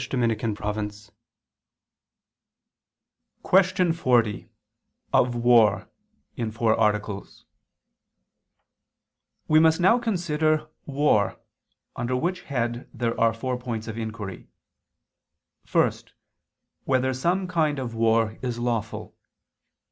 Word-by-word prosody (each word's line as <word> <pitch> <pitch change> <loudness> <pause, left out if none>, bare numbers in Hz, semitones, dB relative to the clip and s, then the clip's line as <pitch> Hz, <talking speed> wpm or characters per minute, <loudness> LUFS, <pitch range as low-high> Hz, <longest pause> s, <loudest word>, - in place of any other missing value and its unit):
_______________________ 105 -3 -2 2.3
QUESTION 185 -2 +3
40 120 -9 +1 0.6
OF 125 -1 +3
WAR 120 -2 +4 0.5
(In 115 -2 -2
Four 110 0 +1
Articles) 105 -2 -2 2.0
We 155 0 +5
must 160 +1 +4
now 190 +7 +4
consider 155 -8 0 0.2
war, 140 -8 +1 0.6
under 120 +2 -2
which 180 +8 -1
head 120 -2 -2
there 115 -1 -2
are 115 0 +5
four 125 +2 -3
points 115 -3 -5
of 110 - -5
inquiry: 110 -4 -6 1.2
(1) - - +4 0.9
Whether 130 0 +1
some 175 +8 0
kind 160 -4 0
of 125 -3 -4
war 115 -1 +1
is 125 -2 -3
lawful? 115 -2 -3
120 Hz, 90 wpm, -25 LUFS, 110-155 Hz, 2.3 s, We